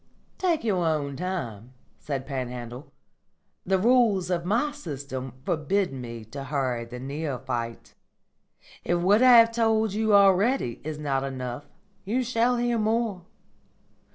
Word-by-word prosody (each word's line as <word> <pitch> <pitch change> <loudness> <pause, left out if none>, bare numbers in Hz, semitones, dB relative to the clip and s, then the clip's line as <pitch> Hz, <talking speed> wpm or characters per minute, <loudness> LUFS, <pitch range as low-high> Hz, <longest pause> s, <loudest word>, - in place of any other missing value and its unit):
"Take 345 -7 +1
your 195 -6 +1
own 150 -4 -1
time," 130 - -5 0.3
said 135 -2 -4
Panhandle. 125 -1 -6 0.8
"The 190 0 +3
rules 210 -4 +3
of 170 -1 -1
my 235 +10 +1
system 140 - -6
forbid 175 +2 0
me 115 -3 -7
to 135 +5 -8
hurry 130 -4 -1
the 125 +1 -8
neophyte. 130 -4 -4 0.9
If 175 - +1
what 195 +6 +3
I 250 -2 +8
have 230 0 +7
told 220 -2 +1
you 215 0 +2
already 200 - +3
is 155 0 -5
not 140 -3 -1
enough, 130 0 -5 0.4
you 240 +6 0
shall 245 0 +1
hear 240 -1 0
more. 215 -4 0
170 Hz, 130 wpm, -26 LUFS, 130-220 Hz, 0.9 s, I